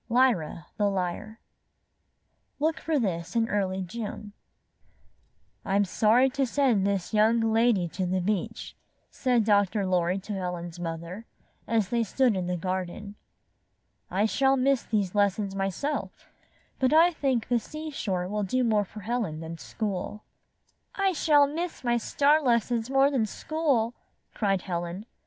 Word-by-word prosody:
LYRA, 230 -11 +2
THE 205 -1 +2
LYRE 195 +4 -3 1.2
Look 310 -1 0
for 315 +1 0
this 180 -6 -2
in 225 -1 +2
early 190 -3 -1
June 210 +1 -6 1.3
"I'm 200 +1 +2
sorry 225 +7 +4
to 275 -1 0
send 235 -7 +2
this 200 0 -2
young 220 +2 +4
lady 225 -4 +2
to 185 +2 -3
the 185 +1 0
beach," 195 +1 -3 0.4
said 250 -4 +1
Dr. 205 -1 +2
Lorry 180 0 +1
to 195 +2 -6
Helen's 175 -2 -5
mother, 170 +5 -6 0.4
as 220 -4 +1
they 235 0 +1
stood 240 +1 +2
in 185 -2 -2
the 180 0 -1
garden. 185 +3 -4 1.0
''I 200 +3 +2
shall 270 +4 +2
miss 265 0 +2
these 205 -5 -1
lessons 200 -1 +1
myself, 195 - -3 0.5
but 260 -2 +2
I 330 +3 +6
think 270 -7 -1
the 240 -1 +2
seashore 240 - -4
will 210 +2 -2
do 250 +6 0
more 215 -3 +2
for 210 +2 -11
Helen 215 -8 -2
than 165 0 -7
school." 210 -1 -4 0.7
''I 390 -1 +1
shall 295 -3 +4
miss 325 +3 -4
my 240 -1 +2
star 290 +6 +3
lessons 235 -2 +1
more 270 +1 +4
than 240 -6 +1
school," 270 -4 0 0.4
cried 195 -4 0
Helen. 175 +2 -4
215 Hz, 140 wpm, -27 LUFS, 185-255 Hz, 1.3 s, I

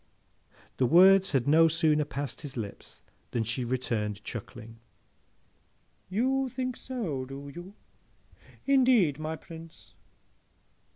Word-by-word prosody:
The 130 - +2
words 190 +5 +6
had 135 -3 0
no 160 +3 +6
sooner 155 -2 +2
passed 145 -1 -5
his 145 -4 -8
lips 105 -4 -8 0.3
than 115 - -1
she 115 +3 -2
returned, 110 -4 -2
chuckling, 115 0 -8 1.3
'You 260 +6 0
think 255 0 -3
so, 205 - -4
do 135 +2 -8
you? 180 +4 -10 0.9
Indeed, 250 - +4
my 155 +1 -3
Prince? 165 0 -13
155 Hz, 110 wpm, -28 LUFS, 130-195 Hz, 1.3 s, words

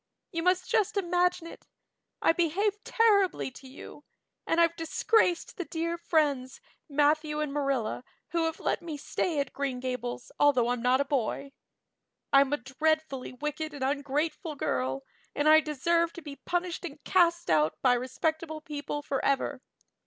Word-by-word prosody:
You 330 -3 -2
must 365 +1 +2
just 415 -1 +1
imagine 360 -2 +1
it. 335 - -11 0.6
I - - +6
behaved 390 +6 0
terribly 400 -10 +2
to 265 +1 -13
you 275 +2 -11 0.4
and 330 - +2
I've 335 0 +4
disgraced 350 +4 +1
the 360 - -3
dear 335 +1 -2
friends, 300 - 0 0.3
Matthew 300 +1 +2
and 300 -2 -2
Marilla, 275 -5 -1 0.3
who 335 -1 0
have 325 - -3
let - - -1
me 320 -3 -6
stay 310 +2 -1
at 275 -2 -2
Green 275 -3 -2
Gables 250 -1 -4
although 255 -5 +4
I'm 245 -1 -1
not 250 +2 +3
a - - 0
boy. 275 0 -2 0.8
I'm 275 0 +6
a 290 - +2
dreadfully 300 +1 -1
wicked 300 +3 -4
and 275 - -5
ungrateful 290 +3 -1
girl, 130 - -1 0.3
and 290 +1 +1
I 310 0 +8
deserve 335 +3 +1
to 340 - -10
be 285 -2 -7
punished 355 0 -1
and 300 -3 -8
cast 340 - +2
out 155 0 +3
by 250 -2 +5
respectable 315 +6 -2
people 295 -1 -5
forever. 275 -1 0
300 Hz, 155 wpm, -29 LUFS, 270-335 Hz, 0.8 s, I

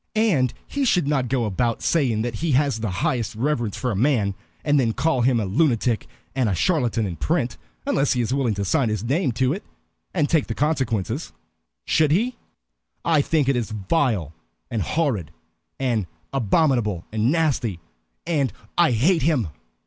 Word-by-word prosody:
And 185 - +3
he 285 - -2
should 180 - +2
not 135 -4 +1
go 125 -2 0
about 115 +3 -1
saying 125 -9 +2
that 120 -1 -2
he 160 +1 0
has 135 -3 +2
the 110 -1 -2
highest 110 +5 -1
reverence 120 -3 -1
for 125 -1 -1
a - - -2
man, 110 -3 +2 0.3
and 145 -1 +4
then 115 -4 +1
call 140 -1 +1
him 120 -1 +3
a 105 - -1
lunatic 120 - +1 0.3
and 125 -4 +1
a 95 - 0
charlatan 120 - +1
in 90 -4 -4
print, 135 - 0 0.3
unless 145 - +2
he 125 - 0
is 120 +2 -1
willing 130 -6 +1
to 100 0 -2
sign 115 +5 +2
his 105 -1 -2
name 135 +4 +1
to 130 +3 +1
it, 195 +4 -6 0.5
and 155 -5 +1
take 160 -3 +2
the 115 - -3
consequences. 130 - -1 0.5
Should 155 -2 +3
he? 225 +11 +1 0.7
I 160 -3 +4
think 150 -1 +1
it 135 - +3
is 120 -2 -1
vile, 105 - 0 0.4
and 115 - -1
horrid, 110 - 0 0.5
and 120 -8 0 0.3
abominable, 120 - +1
and 110 +3 +1
nasty, 135 - 0 0.5
and 150 -6 +1 0.3
I 170 -7 +5
hate 160 - +3
him." 130 - +1
130 Hz, 175 wpm, -23 LUFS, 110-150 Hz, 0.7 s, I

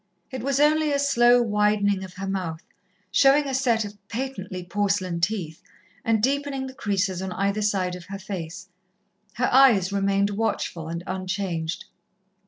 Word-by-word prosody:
It 260 -2 -5
was 275 +2 0
only 305 +1 +3
a 285 - +2
slow 245 -3 +4
widening 210 -2 +1
of 185 -1 -10
her 195 - -5
mouth, 180 -4 -3 0.5
showing 280 +2 +5
a 270 - -3
set 240 -4 +1
of 205 0 -10
patently 210 -7 -5
porcelain 185 -2 -1
teeth, 175 -4 -2 0.4
and 220 -2 +1
deepening 275 0 0
the 260 - -8
creases 195 -5 -1
on 190 -1 -4
either 200 +3 0
side 190 -3 0
of 180 -1 -10
her 195 +2 -6
face. 185 -2 -7 0.7
Her 245 +4 0
eyes 225 -8 +5
remained 200 0 +1
watchful 200 -6 -2
and 170 +1 -5
unchanged. 185 -3 -3
200 Hz, 155 wpm, -25 LUFS, 185-245 Hz, 0.7 s, showing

